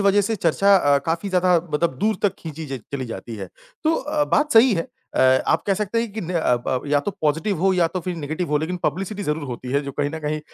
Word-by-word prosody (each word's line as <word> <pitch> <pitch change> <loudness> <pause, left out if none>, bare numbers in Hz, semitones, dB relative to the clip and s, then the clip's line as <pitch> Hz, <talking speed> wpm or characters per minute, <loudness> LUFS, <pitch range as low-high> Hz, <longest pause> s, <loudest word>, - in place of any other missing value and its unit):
वजह 200 +1 +4
से 215 +3 -1
चर्चा 195 +3 +3
अ, 145 -6 +3
काफ़ी 165 +5 -1
ज़्यादा 185 -1 +3 0.2
मतलब 150 -2 0
दूर 215 +3 +1
तक 200 -2 +2
खींची 160 -1 -7
ज 135 -3 -5
चली 135 -2 -2
जाती 115 0 -7
है। 95 -3 -6 0.4
तो 320 +1 +3
अ, 295 +1 0
बात 300 +1 +1
सही 235 +1 +7
है 165 - -2 0.3
अ, 130 0 +4
आप - - +2
कह 195 - +3
सकते 210 +3 -1
हैं 230 -3 -4
कि 220 - -4
न 180 -1 -5
अब 125 -7 +1
अब 130 +2 -1
या 145 0 +2
तो 145 - -3
पॉज़िटिव 160 +6 0
हो 190 +1 +3
या 180 -2 +3
तो 185 - -4
फिर 180 +1 -4
नेगेटिव 155 +3 -3
हो 150 - +3
लेकिन 160 +4 -2
पब्लिसिटी 195 +6 -2
ज़रूर 150 -3 -2
होती 125 0 -6
है। 140 - +3
जो 140 -1 -6
कहीं 145 0 +1
न 160 - -4
कहीं 150 0 -2
170 Hz, 260 wpm, -22 LUFS, 145-200 Hz, 0.4 s, सही